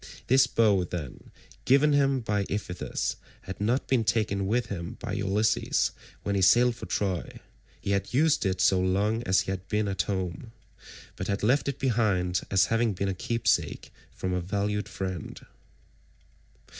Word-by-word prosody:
This 130 +2 +5
bow, 105 -5 +3
then, 85 -6 -7 0.3
given 140 +3 +4
him 135 -2 +2
by 105 -3 -1
Iphitus, 95 -3 -3 0.2
had 95 +2 -8
not 120 +6 0
been 125 -4 +2
taken 100 -2 0
with 120 +4 +1
him 85 -4 -6
by - - -5
Ulysses 105 +2 +1 0.3
when 100 - -1
he 100 - +1
sailed 120 +6 +5
for - - -8
Troy; 95 -4 -2 0.4
he 100 - -3
had 100 0 -1
used 155 +4 +3
it 95 -2 -1
so 95 0 +4
long 100 +5 +1
as 95 0 +4
he - - -4
had 95 0 -5
been 105 0 0
at 95 -2 0
home, 95 +4 -4 0.6
but 90 - -5
had 100 0 -2
left 130 +7 +2
it 140 - -4
behind 105 -9 +1
as 95 -2 +4
having 115 -1 +2
been 95 +1 -2
a - - -1
keepsake 115 +5 -1 0.2
from 95 0 -4
a 90 - 0
valued 100 +2 -2
friend. 95 -3 -5
100 Hz, 165 wpm, -27 LUFS, 95-115 Hz, 0.6 s, This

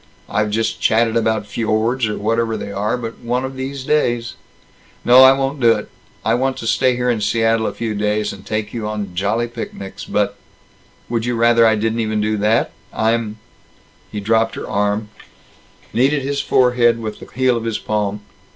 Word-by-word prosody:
I've 105 0 0
just 110 +1 -1
chatted 115 0 +2
about 110 -2 +1
fjords, 115 +3 0
or 105 - -3
whatever 115 +1 0
they 100 - -6
are, 105 +4 -1
but 115 -2 -6
one 125 +2 -1
of 130 0 -6
these 135 +1 -5
days 120 -5 0 0.7
No. 125 +2 +8
I 130 0 +9
won't 135 +1 -1
do 115 -2 +5
it. - - -5 0.4
I 110 - +3
want 130 +2 0
to - - -6
stay 125 +2 +2
here 125 0 +1
in 115 -3 -2
Seattle 115 +1 +1
a - - -1
few 115 -2 -3
days, 105 0 -1
and 95 -1 -12
take 110 +1 -3
you 115 -3 -3
on 105 -3 -4
jolly 105 +6 0
picnics, 100 -4 -7
but - - -1 0.7
Would 115 -1 -1
you 120 - 0
rather 115 0 +5
I 110 - +4
didn't 110 +2 -1
even 110 -1 0
do 110 +1 0
that? 105 +3 +2 0.2
I'm 110 -1 0 0.4
" 90 0 -32
He 105 - -4
dropped 115 +2 +1
her - - -5
arm, 105 +1 -1 0.8
kneaded 135 +3 +2
his 140 +1 -1
forehead 125 -3 +3
with 110 -2 -5
the - - -12
heel 130 -1 +2
of 115 -1 -3
his 115 -2 -1
palm. 105 -1 -2
115 Hz, 190 wpm, -19 LUFS, 105-120 Hz, 0.8 s, I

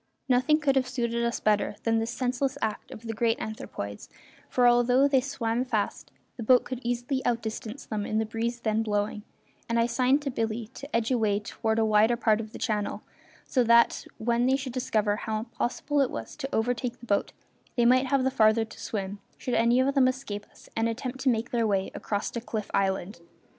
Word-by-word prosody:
Nothing 270 +4 +3
could 280 -3 +2
have 265 -1 +3
better 250 - -9 0.3
suited - - 0
us 215 -3 +1
than 225 0 +2
this 225 +1 -2
senseless 255 +2 -1
act 215 -1 -3
of 220 - -10
the 225 - -3
great 225 +1 +1
anthropoids, 100 - -6 0.4
for, 245 -1 +4
although 245 +3 +5
they 270 -2 +3
swam 245 -3 -1
fast, 220 -5 -2 0.3
the - - -6
boat 250 +3 +5
could 255 -1 -5
easily 245 +3 -1
out 235 -1 0
distance 220 +3 -6
them 215 -2 -3
in 215 - -1
the 220 - +1
breeze 230 +2 -3
then 220 -1 +1
blowing, 210 -1 -1 0.5
and 230 - +1
I 230 - +4
signed 260 +4 +2
to 275 - -2
Billy 225 -1 -3
to 280 -1 -7
edge 230 +1 +1
away 215 -5 +2
toward 220 +1 -2
a 225 - +3
wider 220 +2 +4
part 220 -2 +2
of 215 -1 -9
the - - -8
channel, 210 -1 -2 0.4
so 255 - +2
that 235 0 +4
when 235 +2 +1
they 265 - +4
should 265 -2 -4
discover 215 -5 0
how 220 -1 -2
impossible 245 +5 -1
it 265 - +2
was - - -6
to 270 -2 -4
overtake 240 +1 -1
the 240 - -12
boat 200 -3 0 0.4
they 240 - +3
might 255 +2 +5
have 270 0 +2
the 265 - +1
farther 220 -1 +4
to 220 - -14
swim, 200 -1 -4 0.2
should 250 - -4
any 235 +2 +4
of 270 +2 +2
them 270 -2 +5
escape 235 -6 -4
us - - -18
and 225 +1 +1
attempt 250 +3 -4
to 265 - +2
make 230 -1 0
their 230 -2 +1
way 195 -2 0
across 205 -1 -3
to 235 - -4
Cliff 220 -3 -5
Island. 190 -1 0
235 Hz, 210 wpm, -27 LUFS, 220-255 Hz, 0.5 s, although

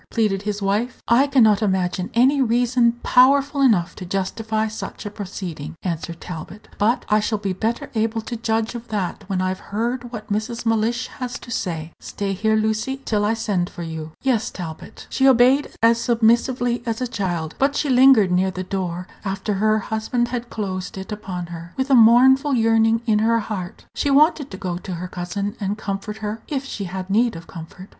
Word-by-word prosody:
pleaded 210 -4 0
his 205 0 -3
wife. 210 +6 -1
"I 250 +5 +4
can 270 -3 +4
not 210 -1 +4
imagine 190 -2 0
any 265 +4 +4
reason 240 0 +3
powerful 275 +3 +4
enough 210 -11 +3
to - - -7
justify 215 +4 -2
such 220 0 -7
a 205 - -4
proceeding," 180 -7 -6
answered 170 -1 -4
Talbot; 180 +4 -9
"but 230 +4 +2
I 210 - +3
shall 215 +1 -1
be 200 -2 -2
better 225 +5 -2
able 225 0 0
to 235 +2 -6
judge 225 0 -1
of 240 0 -7
that 205 -1 -3
when 185 -1 0
I've 185 0 -2
heard 240 +3 -3
what 215 -3 -5
Mrs. 230 +3 -3
Mellish 225 +2 +1
has 250 -1 -4
to 240 - -11
say. 165 -7 -3
Stay 200 -1 -4
here, 220 +3 +1
Lucy, 220 +5 0
till 210 -2 +1
I 215 +2 +1
send 205 -6 -1
for 175 - -8
you." 160 -1 -6
"Yes, 245 -5 +1
Talbot." 165 -4 -8
She 265 - +3
obeyed 260 +2 +5
as 230 0 +5
submissively 235 +1 +2
as 225 -1 -1
a 255 - -1
child; 175 -8 -3
but 280 +1 +2
she 295 - 0
lingered 255 -7 +6
near 185 +1 +2
the 185 0 -5
door, 180 -2 -3 0.2
after 195 +1 -2
her 215 +2 +2
husband 220 +3 -1
had 240 -1 -4
closed 185 -4 -4
it 190 +3 -7
upon 190 -4 -5
her, 170 +1 -9
with 265 +1 -1
a - - +6
mournful 260 +4 +6
yearning 225 0 +3
in 215 -3 +3
her 230 +1 +3
heart. 200 -5 -5
She 285 - -1
wanted 295 0 +4
to 190 - -8
go 180 -2 -4
to 185 0 -6
her 180 +2 -5
cousin, 200 +4 -4
and 200 0 -2
comfort 210 0 -4
her, 215 +2 -4
if 275 -2 -3
she 210 -7 -5
had 185 +1 -5
need 230 +1 +2
of 165 0 -9
comfort. 170 +2 -10
215 Hz, 195 wpm, -22 LUFS, 190-240 Hz, 0.2 s, lingered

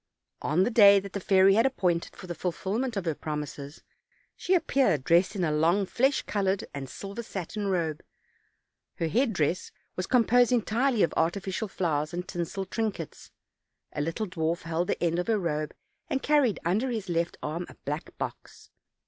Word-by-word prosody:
On 165 +5 +2
the 240 - 0
day 200 -3 +8
that 195 0 -9
the 200 - -2
fairy 190 0 +5
had 225 +5 +4
appointed 180 -10 -1
for - - -10
the 175 - -4
fulfill 190 +5 -2
ment 250 -4 -2
of 195 - -2
her 165 - +1
promises, 150 -1 -6 0.5
she 375 - +1
appeared 260 - +2
dressed 175 +7 +3
in 190 - -1
a 155 - +1
long 170 +6 +2
flesh 265 +8 +1
colored 195 -1 0
and 135 -2 -6
silver 200 - -6
satin 205 -1 -5
robe; 165 -5 -1 0.9
her 165 - -1
headdress 180 - 0 0.2
was 185 - -3
composed 245 0 +4
entirely 240 +1 +2
of - - +1
artificial 190 +5 -1
flowers 155 -4 -1
and 180 +1 -4
tinsel 180 +2 -3
trinkets; 200 -5 -4 0.6
a 145 - -2
little 165 +8 -2
dwarf 170 -3 -2
held 165 +1 -1
the - - -1
end 170 0 +1
of 180 - -2
her 225 -2 +2
robe, 155 -5 -2 0.4
and 270 - -1
carried 280 - +3
under 210 +10 +1
his 220 -5 -3
left 170 -1 -1
arm 165 +4 -3
a - - -13
black 150 +4 -5
box. - - -7
185 Hz, 175 wpm, -28 LUFS, 165-215 Hz, 0.9 s, day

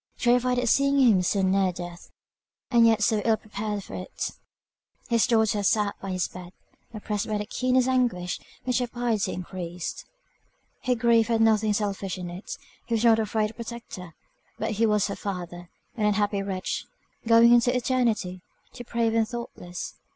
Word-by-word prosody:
Terrified 250 +1 +2
at 245 0 0
seeing 275 +3 +3
him 225 -8 +5
so 190 +2 +1
near 190 0 +2
death, 175 -1 -9 0.6
and 235 -2 +6
yet 225 -2 +3
so 215 +1 +2
ill 225 -1 +3
prepared 210 -1 -5
for - - -11
it, 185 - -5 0.8
his 230 -2 +3
daughter 220 -3 +2
sat 205 0 +2
by 195 - -5
his 185 -1 -1
bed, 180 0 -11 0.4
oppressed 210 -2 -3
by 215 -1 -1
the 210 - -3
keenest 255 +3 +1
anguish, 240 -9 0 0.2
which 250 0 +1
her 245 - -1
piety 235 -4 -1
increased. 180 -1 -6 0.8
Her 250 - +2
grief 230 -1 +3
had 230 -1 +1
nothing 220 -1 +3
selfish 200 -2 -2
in 180 -1 -6
it; 180 +4 -10 0.4
he 235 - 0
was 225 - 0
not 225 -1 +6
a 220 - 0
friend 215 0 0
or - - -19
protector; 225 -8 -8 0.4
but 220 - -2
he 225 +2 +2
was 210 -1 +2
her 200 - -3
father, 175 -3 -6 0.3
an 215 -3 0
unhappy 205 -1 +1
wretch, 190 -2 -3 0.4
going 230 +1 +7
into 245 +1 +4
eternity, 230 -8 0 0.3
depraved 235 -2 -1
and 225 -1 +2
thoughtless. 215 -7 -7
215 Hz, 170 wpm, -26 LUFS, 190-235 Hz, 0.8 s, going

